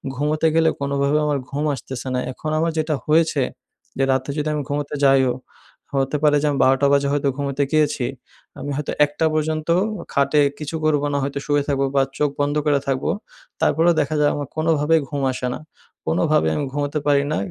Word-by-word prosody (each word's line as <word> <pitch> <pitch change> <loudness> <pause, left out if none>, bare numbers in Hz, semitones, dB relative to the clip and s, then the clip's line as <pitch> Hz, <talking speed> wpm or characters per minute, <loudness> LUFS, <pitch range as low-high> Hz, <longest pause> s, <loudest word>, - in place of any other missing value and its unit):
ঘুমোতে 150 +4 +1
গেলে 165 0 +4
কোনোভাবে 140 +1 +1
আমার 145 -2 0
ঘুম 145 +2 -2
আসতেছে 130 +1 -7
না। - - +1
এখন 155 +4 -6
আমার 165 +1 +1
যেটা 155 -1 0
হয়েছে 155 -1 +3 0.6
যে, 135 - +2
রাতে 130 +1 -1
যদি 150 - -1
আমি 150 - -1
ঘুমোতে 145 0 -2
যাইও, 135 -2 +4 0.6
হতে 135 +2 +1
পারে 150 -1 +5
যে - - 0
আমি 140 - -1
১২ঃ০০ 135 +1 +4
টা 140 - +5
বাজে 140 0 +3
হয়তো 145 -1 +1
ঘুমোতে 140 0 -1
গিয়েছি। 150 -4 +2 0.5
আমি 145 - -5
হয়তো 150 0 -3
১ঃ০০ 145 +2 -2
পর্যন্ত 155 0 -1 0.3
অ - - -8
খাটে 145 +1 +3 0.2
কিছু 150 +1 -5
করবো 145 -2 +2
না - - +1
হয়তো 140 +1 -3
শুয়ে 145 -1 +1
থাকবো 140 -1 +1
বা 135 - +5 0.2
চোখ 150 - +2
বন্ধ 145 +1 +1
করে 145 -2 +3
থাকবো। 135 -1 0 0.5
তারপরেও 170 +2 +3
দেখা 150 +2 -2
যায় 145 0 +3
আমার 145 -1 -4
কোনোভাবেই 160 0 +2
ঘুম 145 -2 -3
আসে 125 - -3
না। - - -6 0.5
কোনোভাবে 80 - +2
আমি 145 - -1
ঘুমোতে 145 +2 -2
পারি 140 -1 +4
না। - - 0
145 Hz, 195 wpm, -21 LUFS, 140-155 Hz, 0.6 s, পারে